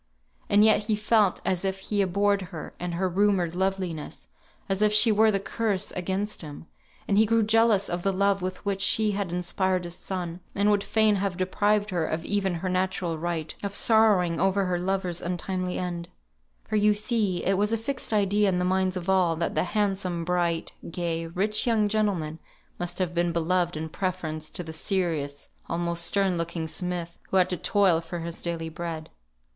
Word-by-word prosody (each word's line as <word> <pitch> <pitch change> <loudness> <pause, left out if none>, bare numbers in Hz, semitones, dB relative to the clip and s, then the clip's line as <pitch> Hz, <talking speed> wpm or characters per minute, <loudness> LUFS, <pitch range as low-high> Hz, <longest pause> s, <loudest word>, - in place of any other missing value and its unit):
And 205 +1 +6
yet 215 -1 +4
he 215 -1 +1
felt 210 -2 +2
as 185 -1 0
if 190 0 -1
he 200 +1 -1
abhorred 200 +2 +2
her 160 -3 -8
and 175 -1 -3
her 185 +2 0
rumoured 185 -2 +1
loveliness, 185 - -3 0.4
as 195 +1 -1
if 210 0 +4
she 215 +2 +6
were 220 +1 +5
the 200 -2 +1
curse 205 -1 -1
against 190 +3 -2
him; 150 -1 -9 0.4
and 200 0 +3
he 220 - +6
grew 230 0 +3
jealous 220 -2 +3
of 175 0 -3
the 195 - +1
love 195 0 +1
with 185 +2 -5
which 195 -1 -1
she 210 +1 +3
had 200 -3 -2
inspired 180 +1 0
his 175 -1 -6
son, 180 -2 -5 0.2
and 205 +1 +3
would 205 -1 +2
fain 215 -1 +3
have 195 -2 -2
deprived 205 +3 +1
her 175 -3 0
of 160 +1 -3
even 195 -3 0
her 175 +3 -3
natural 185 -2 -1
right 165 -2 -3
of 200 0 -4
sorrowing 205 -8 +4
over 195 0 +2
her 180 -1 0
lover's 185 -1 -1
untimely 180 +1 -3
end: 175 -1 -4 0.6
for 215 - 0
you 210 0 +4
see 210 -4 0
it 195 - +3
was 205 +3 +1
a 230 - +2
fixed 255 +3 -3
idea 205 -1 +3
in 180 - 0
the 180 - 0
minds 185 0 +1
of 180 0 -6
all, 185 -3 +3
that 170 +1 -2
the - - +1
handsome, 190 -5 -1
bright, 175 -2 0 0.2
gay, 165 -1 -2
rich 205 +7 -1
young 220 -3 +3
gentleman 195 -7 -1 0.4
must 175 0 -3
have 180 -2 -1
been 175 0 +1
beloved 170 0 0
in 160 +1 -3
preference 160 -3 -3
to 175 - -5
the 160 -1 -8
serious, 160 -6 -2 0.2
almost 170 0 0
stern 190 -1 +1
looking 165 -1 -3
smith, 175 0 -4
who 190 - +2
had 185 0 +3
to - - +1
toil 190 -3 +3
for 170 +1 -6
his 170 0 -6
daily 170 -1 -3
bread. 160 -1 -6
185 Hz, 195 wpm, -26 LUFS, 170-205 Hz, 0.6 s, And